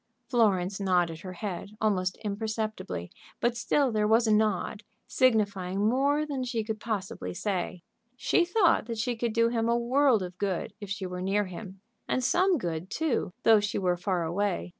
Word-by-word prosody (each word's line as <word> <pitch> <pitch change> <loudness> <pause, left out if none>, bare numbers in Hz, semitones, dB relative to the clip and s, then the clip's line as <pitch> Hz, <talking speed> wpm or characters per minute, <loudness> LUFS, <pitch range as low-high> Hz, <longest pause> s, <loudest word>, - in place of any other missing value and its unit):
Florence 200 -6 +2
nodded 175 -4 +1
her 185 +1 -7
head, 200 +2 -6
almost 185 -4 0
imperceptibly, 215 - -3 0.3
but 240 0 +1
still 265 +3 +1
there 210 -1 +1
was 225 +2 +4
a 215 - +3
nod, 210 0 +1 0.2
signifying 200 -5 +1
more 280 +5 +2
than 280 -4 -3
she 240 -3 -2
could 215 0 -4
possibly 190 - -4
say. 180 -3 -3 0.3
She 345 - +3
thought 350 - +3
that 230 -1 -4
she 240 +2 -1
could 230 0 -1
do 230 0 +3
him 230 -1 0
a 235 - +3
world 245 -2 +3
of 180 0 -8
good 195 -2 -2
if 205 - -7
she 200 -1 -3
were 180 0 -5
near 200 +2 +1
him, 190 +1 -9 0.3
and 255 - 0
some 365 +7 +3
good, 170 - -4
too, 290 - -1
though 225 -1 +7
she 205 0 -2
were 180 -2 +1
far 180 0 -1
away. 185 +3 -1
210 Hz, 180 wpm, -28 LUFS, 185-235 Hz, 0.3 s, though